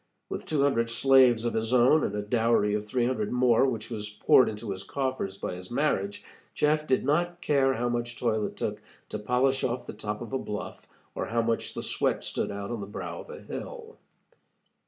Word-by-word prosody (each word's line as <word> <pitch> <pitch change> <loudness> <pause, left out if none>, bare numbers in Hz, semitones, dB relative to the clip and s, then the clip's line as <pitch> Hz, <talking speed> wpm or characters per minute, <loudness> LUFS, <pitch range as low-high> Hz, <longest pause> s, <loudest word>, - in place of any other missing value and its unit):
With - - -5
two 150 -3 +1
hundred 115 -5 +2
slaves 125 -1 +5
of 120 - 0
his 110 +1 -1
own, 130 +5 +5
and - - -1
a 105 - -2
dowry 110 -1 +2
of 105 0 -2
three 120 +2 +1
hundred 120 -4 -1
more 125 +1 +4
which 115 -3 -4
was 105 -2 -3
poured 105 +4 +4
into 105 0 -5
his 95 -1 -4
coffers 130 -4 -3
by - - -4
his 90 +1 -8
marriage, 110 -7 0 0.3
Jeff 150 +1 +2
did 130 - +2
not 175 +4 +1
care 135 -4 +2
how 120 +2 -1
much 120 0 -2
toil 110 -3 0
it - - -11
took - - -3 0.3
to 105 - -4
polish 125 +5 +1
off 125 0 -1
the - - -7
top 105 +1 -5
of 120 - -7
a 130 - +1
bluff 105 -4 -6 0.3
or - - -3
how 115 0 +1
much 115 0 -1
the - - -4
sweat - - 0
stood - - -2
out 100 +1 -5
on 120 - -3
the 100 - -6
brow 105 - -6
of - - -15
a 475 0 -9
hill. 465 -2 -8
120 Hz, 215 wpm, -28 LUFS, 105-135 Hz, 0.3 s, slaves